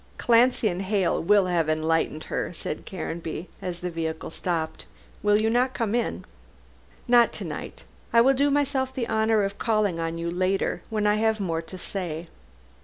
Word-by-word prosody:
"Clancy 240 0 +4
and 180 -2 -1
Hale 195 -2 +1
will 200 +3 +4
enlighten 160 -2 +1
her," - - -3
said 155 - -5
Caranby, 170 -2 -5
as 175 -1 -5
the 180 0 -3
vehicle 160 -1 -4
stopped, 165 -2 -3 0.3
"will 210 0 +4
you 215 +1 +1
not 250 +3 +2
come 225 -3 -1
in?" 230 - -1 0.8
"Not 240 -1 +6
to - - -6
night. - - -7 0.3
I 230 - +5
will 265 +4 +6
do 280 +2 +2
myself 275 -2 +1
the 240 -3 -2
honor 220 -1 +2
of 200 0 -3
calling 215 -6 +1
on 165 0 -2
you 170 0 -3
later, 185 +2 0
when 215 -2 -1
I 210 0 +3
have 220 0 +1
more 165 -4 -1
to 175 +3 -10
say. 170 -3 -4
195 Hz, 175 wpm, -26 LUFS, 165-225 Hz, 0.8 s, Not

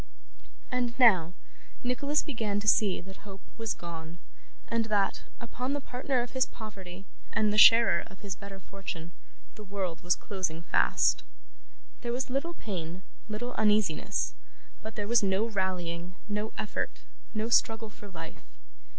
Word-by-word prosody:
And 245 -1 0
now, 185 -9 +6 0.5
Nicholas 280 +4 +1
began 220 -8 -1
to 210 - -5
see 205 -2 +4
that 190 +2 -11
hope 195 -2 -11
was 225 -2 -2
gone, 165 -1 -7 0.5
and 230 -1 +1
that, 205 -3 +1 0.2
upon 250 +3 -3
the 290 - 0
partner 255 -1 -1
of 245 - -8
his 260 -1 +2
poverty, 195 -4 -9 0.3
and 215 -1 +3
the - - 0
sharer 225 -6 +8
of 190 - -15
his 200 -3 -4
better 200 -1 -9
fortune, 180 -3 -7 0.4
the 215 - -10
world 190 -4 -3
was 175 +1 +3
closing 175 -5 -3
fast. - - +3 0.8
There 240 - -2
was 255 +1 -2
little 335 +6 -1
pain, 180 - -5 0.3
little 240 +4 -3
uneasiness, 210 -2 +2 0.5
but 220 0 -7
there 205 -1 -2
was 235 +1 +5
no 195 +2 +2
rallying, 180 -4 -2
no 210 +1 -2
effort, 215 - -3 0.3
no 215 +2 0
struggle 225 -2 +3
for 205 - -12
life. 165 -4 -8
210 Hz, 150 wpm, -30 LUFS, 185-230 Hz, 0.8 s, sharer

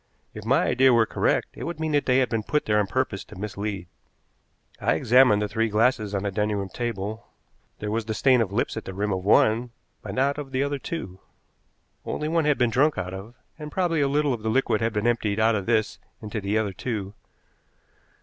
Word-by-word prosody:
If - - -9
my - - +3
idea 130 +1 +4
were 115 -2 +4
correct, - - 0
it - - -7
would 170 -2 -5
mean 160 -1 -1
that 145 -1 +1
they 125 0 +4
had 130 -1 +2
been 115 -1 -1
put 150 +7 -1
there 105 -1 +2
on 105 - +1
purpose 130 -3 -2
to - - -13
mislead. 100 -2 -5 0.9
I - - +1
examined 120 -4 +4
the - - -1
three 115 +2 0
glasses 110 -1 +1
on 100 - -1
the 100 - -1
dining 105 +1 0
room 100 -1 -4
table; 110 -1 -4 0.5
there 105 - -4
was 115 0 -1
the 110 -1 -3
stain 130 -1 +4
of 105 -4 -1
lips 105 - -1
at 110 - -6
the 95 - -7
rim 100 +1 -1
of 95 -1 -3
one, 110 +4 +3 0.3
but - - -7
not 140 +3 +1
of 135 -2 -8
the 130 +1 +1
other 140 0 -2
two. 110 - -6 0.8
Only 150 - -3
one 165 0 +1
had 150 -2 +3
been 120 -1 +2
drunk 145 +5 +2
out 90 0 -4
of, 100 +6 -9 0.2
and 150 -1 -7
probably 170 -4 0
a 140 - +3
little 145 0 +1
of 115 - -5
the 110 - -2
liquid 110 -2 +1
had 115 0 +1
been 105 +1 -1
emptied 115 -3 +1
out 110 +1 +4
of 100 -2 -2
this 110 -2 +1 0.2
into 105 0 -5
the 100 +2 0
other 105 -3 -1
two. 100 -2 -4
110 Hz, 225 wpm, -25 LUFS, 105-130 Hz, 0.9 s, idea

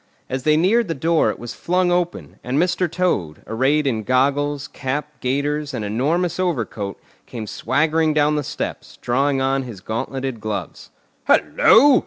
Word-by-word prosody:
As 130 0 -1
they 155 +3 +3
neared 205 +7 +3
the 165 - -2
door 165 +3 +2
it - - -3
was 120 0 -7
flung 180 +1 +1
open, 175 0 -2
and 125 +3 -2
Mr. 175 +1 +1
Toad, 165 - -1
arrayed 135 +7 +1
in 115 -5 0
goggles, 140 +4 +1
cap, 145 +3 -4
gaiters, 145 +3 -1
and 105 - -3
enormous 160 - 0
overcoat, 115 - -2 0.3
came 115 -3 -6
swaggering 160 +8 +1
down 150 0 +2
the 150 - 0
steps, - - -5
drawing 135 +2 +1
on 135 +1 +1
his 120 -7 -8
gauntleted 120 +3 -4
gloves. 100 -6 -5 0.4
"Hullo! 270 +3 +6
145 Hz, 155 wpm, -21 LUFS, 125-165 Hz, 0.4 s, Hullo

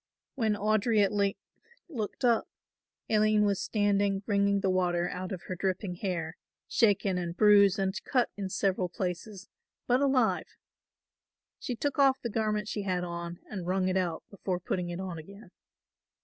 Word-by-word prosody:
When 220 -5 +1
Audry 215 +1 +2
at 195 - +1
length 200 -1 0 0.5
looked 250 - -4
up, 235 -2 +3 0.6
Aline 215 -1 +3
was 200 -2 +1
standing 205 -2 +1
wringing 200 -1 +2
the 195 - +1
water 175 -1 +1
out 180 +1 -5
of 185 -3 -5
her 185 - -5
dripping 190 +1 -2
hair, 170 -4 -3 0.3
shaken 200 -4 +2
and 175 0 -4
bruised 205 -1 +6
and 190 -1 0
cut 250 -3 +1
in 195 -2 -4
several 190 -1 0
places, 185 +3 -5 0.4
but 250 +2 +2
alive. 265 -4 +1 1.0
She 245 - -4
took 285 +4 -2
off 270 -1 +5
the 235 - -4
garment 210 -1 -1
she 215 - -3
had 185 -2 -1
on 170 0 -6
and 185 -4 -6
wrung 185 0 +1
it 185 - 0
out 175 -3 -1
before 190 -2 -3
putting 180 0 -3
it 175 +1 -5
on 185 -3 -5
again. 200 +7 -13
200 Hz, 165 wpm, -29 LUFS, 180-215 Hz, 1.0 s, bruised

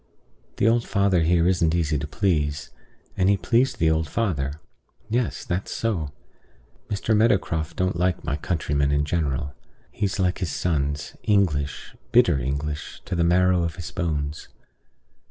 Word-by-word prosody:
The 100 - +3
old 115 +1 +3
father 100 -4 +2
here 85 +1 +3
isn't 85 -3 +2
easy 75 -3 +1
to 75 - -4
please; 75 -5 -1 0.4
and 95 +1 +2
he 100 - +4
pleased 125 +6 +1
the 80 -1 +3
old 80 -1 0
father. 75 -10 -1 0.5
Yes, 120 +1 -1
that's 90 +3 -2
so. 95 -10 -1 0.8
Mr. 105 +2 0
Meadowcroft 95 -8 +1
don't 95 0 0
like 90 0 0
my 70 - -1
countrymen 75 -3 0
in 70 0 +2
general. 70 -3 -1 0.4
He's 100 -1 -2
like 90 -1 +1
his 90 -4 -2
sons 75 -2 -1
English, 80 -9 0 0.2
bitter 70 - +5
English, 70 +4 -4
to 95 - -5
the 85 - +2
marrow 90 +1 +3
of 85 -1 -2
his 85 -3 -7
bones. 75 -4 -3
85 Hz, 150 wpm, -24 LUFS, 75-95 Hz, 0.8 s, bitter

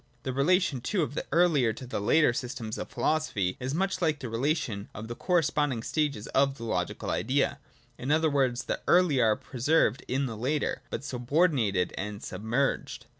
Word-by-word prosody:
The 130 - -3
relation 145 -1 +2
too 185 - 0
of 140 - -4
the - - -4
earlier 150 -8 +3
to 130 - -9
the 125 - -3
later 125 +5 +4
systems 120 -3 -4
of - - -5
philosophy 110 -13 0
is 130 +3 -3
much 190 +3 -1
like 155 -3 +2
the 130 -4 -5
relation 115 -4 -1
of 110 +2 -6
the 120 - -4
cor 180 +7 -1
responding 145 -6 0
stages 145 -9 -1
of 140 0 +2
the 115 - -8
logical 90 -6 -2
Idea: 135 +2 0 0.4
in 130 - -4
other 160 +2 +3
words, 130 -4 +1
the - - -3
earlier 170 -9 +4
are 110 - +3
preserved 130 -1 +1
in 135 +2 0
the 115 -4 -4
later; 135 +7 -1
but - - -4
subordinated 125 - +1
and 105 +1 -5
sub 90 - -6
merged. 120 +5 -1
130 Hz, 185 wpm, -28 LUFS, 115-155 Hz, 0.4 s, later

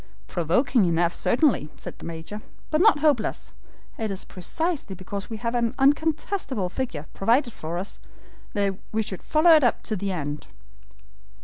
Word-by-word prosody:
"Provoking 190 - +2
enough, 170 0 +2
certainly," 240 - +2
said - - -8
the - - -9
Major, 165 +6 -6 0.3
"but 310 +1 +3
not 395 -8 +5
hopeless. 290 -8 +1 0.5
It 220 -1 -1
is 195 -1 -4
precisely 280 - -2
because 195 +3 -6
we 225 - -4
have 230 +2 -2
an 235 0 0
uncontestable 290 - +1
figure, 185 - -3
provided 240 +4 +2
for 165 +2 -5
us, 190 +3 -5 0.5
that 200 -2 0
we 220 0 +1
should 190 -3 -6
follow 315 +2 +4
it 310 -3 +7
up 240 - +2
to 215 - -2
the 200 0 -2
end." 150 -4 -4
215 Hz, 155 wpm, -25 LUFS, 185-280 Hz, 0.5 s, it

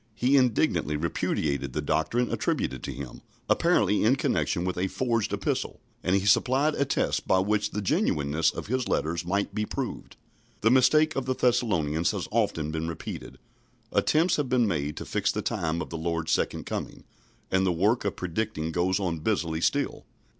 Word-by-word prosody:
He 125 +5 +2
indignantly 120 - +2
repudiated 75 -3 -1
the - - -2
doctrine 120 +9 0
attributed 65 -1 -1
to - - -5
him, 70 -3 -8 0.3
apparently 105 - +3
in 115 +5 +4
connection 90 -8 0
with 90 - -1
a 90 +2 0
forged 115 0 -1
epistle, - - -2 0.2
and 90 +2 +2
he 100 0 +1
supplied 130 +9 +3
a 140 - 0
test 135 - -1
by 95 - +4
which 105 +3 +1
the 105 - -4
genuineness 75 -3 +1
of - - -6
his 125 +2 -1
letters 85 +2 -1
might 100 +2 -1
be 105 - -1
proved. - - -5 0.5
The 110 - +4
mistake 155 +5 +4
of 135 -1 -2
the 130 - 0
Thessalonians 85 -12 +1
has - - -3
often 75 -1 0
been 80 +1 -3
repeated. 85 - -7 0.5
Attempts 165 +4 +2
have 145 -4 -1
been 125 -3 +3
made 75 -5 -2
to - - -5
fix - - 0
the - - -3
time 85 +1 -1
of - - -11
the 80 - -4
Lord's 85 0 -2
second - - 0
coming, - - -5 0.5
and 95 0 +3
the 95 - +2
work 100 +8 +2
of 100 - -2
predicting 90 -3 -3
goes 90 +3 +1
on 85 -5 -2
busily 80 -3 -1
still. 140 +9 0
95 Hz, 180 wpm, -27 LUFS, 80-120 Hz, 0.5 s, in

